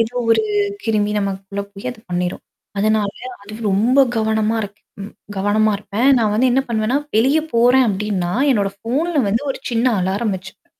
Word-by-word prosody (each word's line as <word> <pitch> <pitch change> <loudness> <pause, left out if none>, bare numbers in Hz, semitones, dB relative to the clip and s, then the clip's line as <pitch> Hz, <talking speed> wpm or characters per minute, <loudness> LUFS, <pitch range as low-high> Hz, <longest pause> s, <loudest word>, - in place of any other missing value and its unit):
ஏதோ 230 +2 0 0.2
ஒரு 225 - +4 0.4
கிருமி 210 -2 0
நமக்குள்ள 195 0 -3
போய் 200 +4 -9
அத 245 - -11
பண்ணிரும். 180 0 -2 0.4
அதனால 215 -1 +2 0.3
அது 205 +1 -11 0.2
ரொம்ப 230 +8 +2 0.2
கவனமா 220 0 +1
இருக் 205 0 -8 0.2
ம் 200 - -9 0.2
கவனமா 210 +2 +2
இருப்பேன். 210 +5 0
நான் 215 -3 +1
வந்து 255 +4 +3
என்ன 265 - +3
பண்ணுவேன்னா, 230 +3 +1 0.2
வெளிய 265 +8 +4 0.2
போறேன் 245 +2 +5
அப்டின்னா, 195 -3 -1 0.2
என்னோட 200 -3 0
ஃபோன்ல 295 - -1
வந்து 225 +6 0
ஒரு - - -4
சின்ன 235 +1 +1
அலாரம் 195 +3 -1
வச்சுப்பே 190 +1 -13
215 Hz, 160 wpm, -19 LUFS, 200-235 Hz, 0.4 s, போறேன்